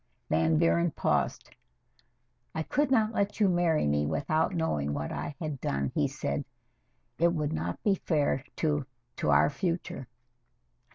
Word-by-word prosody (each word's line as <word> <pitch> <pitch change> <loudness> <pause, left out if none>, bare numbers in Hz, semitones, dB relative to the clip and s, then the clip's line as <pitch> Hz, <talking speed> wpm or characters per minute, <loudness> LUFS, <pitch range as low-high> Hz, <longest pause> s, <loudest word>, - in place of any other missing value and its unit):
Van 80 0 +3
Buren 85 +2 +3
paused. - - -1 1.0
"I 160 - -1
could 290 - +1
not 225 -4 +3
let 200 0 -1
you 205 - +5
marry 175 - +2
me 75 0 +1
without 155 - 0
knowing 75 - 0
what 75 0 -3
I 145 - -4
had 155 -5 -4
done," 70 0 -1
he - - +2
said. - - -3 0.8
"It 170 +1 +4
would 150 -2 -1
not 85 +2 -3
be 205 - +4
fair 145 -7 0
to 150 -3 0 0.3
to - - -1
our 70 - +5
future." 170 -3 -3
150 Hz, 150 wpm, -29 LUFS, -, 1.0 s, you